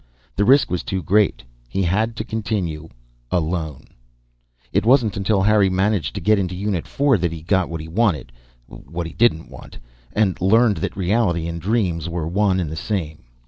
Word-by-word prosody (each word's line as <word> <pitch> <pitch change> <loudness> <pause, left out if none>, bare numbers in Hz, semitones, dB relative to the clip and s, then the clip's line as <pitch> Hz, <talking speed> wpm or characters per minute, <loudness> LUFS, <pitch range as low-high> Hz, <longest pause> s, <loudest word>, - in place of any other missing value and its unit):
The 100 - +1
risk 135 -4 +4
was 90 - -1
too 95 -2 -3
great. 105 +6 +2 0.3
He 95 +10 -1
had 110 +6 0
to 110 - -3
continue 100 -9 -3 0.4
alone. 80 -3 -2 0.9
It - - +2
wasn't 120 -3 +3
until 100 0 +1
Harry 105 -1 +4
managed 95 -3 0
to 100 - -4
get 105 +4 +3
into 90 -2 -2
Unit 95 -2 -2
Four 140 -6 +2
that 85 -1 0
he 80 -2 -8
got 95 +1 +1
what 80 -1 -5
he 80 - -8
wanted 85 - 0 0.3
(what 85 +6 -7
he 80 - -7
didn't 110 -9 +2
want) - - -12 0.3
and 105 -4 0
learned 110 +3 +4
that - - -4
reality 90 -3 +1
and 85 0 -5
dreams 90 -5 0
were 85 -2 -3
one 95 +1 +1
and 80 -4 -3
the - - -4
same. 80 - -4
95 Hz, 185 wpm, -21 LUFS, 85-105 Hz, 0.9 s, risk